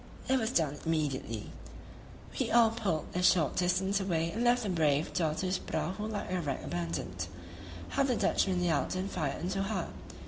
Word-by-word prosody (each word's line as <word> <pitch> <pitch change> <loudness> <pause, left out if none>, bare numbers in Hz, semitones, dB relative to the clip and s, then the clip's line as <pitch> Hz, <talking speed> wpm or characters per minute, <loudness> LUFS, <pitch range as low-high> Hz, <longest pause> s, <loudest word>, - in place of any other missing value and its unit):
It 265 0 +3
was 220 -2 0
done 155 - +1
immediately; 140 -9 -2 0.9
we - - +1
all 230 -1 +6
pulled 200 -9 -1
a 180 - 0
short 175 -5 +4
distance 190 +2 +2
away 170 -4 0
and 225 +5 -2
left 245 0 +4
the 205 - -2
brave 155 -4 +2
Datoo's 180 +3 0
prahu 210 +4 -3
like 205 -4 -4
a 185 -1 0
wreck 140 -4 -3
abandoned. 85 +1 -3 0.6
How - - +1
the 265 -3 +2
Dutchmen 185 -4 +2
yelled 175 +1 +1
and 190 +2 -2
fired 155 -3 -2
into 190 +2 -1
her! 195 -3 -2
180 Hz, 170 wpm, -31 LUFS, 155-200 Hz, 0.9 s, all